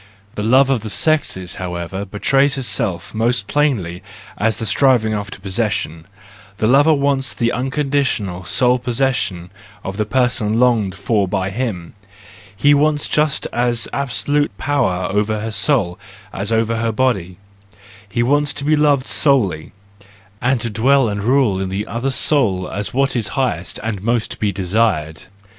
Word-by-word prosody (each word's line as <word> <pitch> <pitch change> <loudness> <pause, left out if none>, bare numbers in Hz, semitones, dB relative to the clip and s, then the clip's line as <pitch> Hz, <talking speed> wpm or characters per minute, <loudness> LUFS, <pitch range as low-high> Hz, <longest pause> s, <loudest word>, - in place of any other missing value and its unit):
The - - -4
love 130 +5 +4
of 130 - +2
the 110 - -6
sexes, 105 - 0
however, 90 +2 -4
betrays 135 +8 +1
itself 110 -9 -3
most 115 0 0
plainly 110 - 0 0.3
as 110 +1 0
the 115 - -3
striving 110 +1 +3
after 100 -1 -4
possession: 95 -5 -2 0.5
the 110 - 0
lover 140 +7 +5
wants 140 -3 +1
the 120 0 0
unconditioned, 130 -9 -1
sole 125 +8 +2
possession 120 -8 -1 0.3
of 95 +1 -5
the 105 - 0
person 120 -3 +1
longed 115 -7 +2
for 100 0 0
by 95 0 -2
him; 100 -7 -4 0.6
he 145 +8 +4
wants 150 0 +2
just 150 -1 +1
as 120 -2 +1
absolute 140 -2 -1
power 130 -11 0
over 105 +1 0
her 110 +1 -4
soul 110 -5 +1 0.3
as 100 +3 -4
over 115 0 +1
her 115 0 0
body; 105 -7 -1 0.7
he 120 +2 0
wants 145 +3 +1
to 145 - -7
be 155 +2 +3
loved 145 -3 +2
solely, 100 - +1 0.7
and 125 0 +1
to 115 - -2
dwell 130 +3 +3
and 100 -1 -3
rule 120 -5 +2
in 95 - -3
the 100 +3 -3
other 120 +4 -3
soul 115 -10 +2
as 100 +1 -3
what 135 +1 0
is 115 -3 0
highest 130 -2 -2
and 110 -4 -3
most 115 +1 -1
to - - -7
be 105 -2 0
desired. 90 -5 -1
115 Hz, 155 wpm, -18 LUFS, 100-135 Hz, 0.7 s, lover